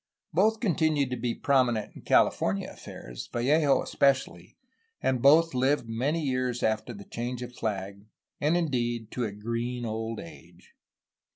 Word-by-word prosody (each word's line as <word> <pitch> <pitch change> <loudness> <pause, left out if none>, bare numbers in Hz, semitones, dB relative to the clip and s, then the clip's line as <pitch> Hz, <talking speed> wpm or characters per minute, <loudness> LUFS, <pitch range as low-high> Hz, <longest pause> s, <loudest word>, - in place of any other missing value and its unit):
Both 220 +6 +3
continued 155 - +1
to - - 0
be 120 -1 -2
prominent 125 -7 +1
in - - -10
California 95 +1 +2
affairs, - - -9
Vallejo 140 +3 +3
especially, 130 -11 0 0.4
and 130 -2 0
both 160 +4 +6
lived 130 0 +1
many 135 +9 -1
years 130 -3 -1
after 110 +2 0
the 100 -3 -10
change 125 +1 -4
of 125 0 -8
flag 100 -1 -4 0.3
and 155 +4 +2
indeed 120 -8 -1
to 125 - -2
a 105 - -3
green 115 +4 -3
old 110 0 -3
age. 85 +1 -13
125 Hz, 145 wpm, -28 LUFS, 110-140 Hz, 0.4 s, both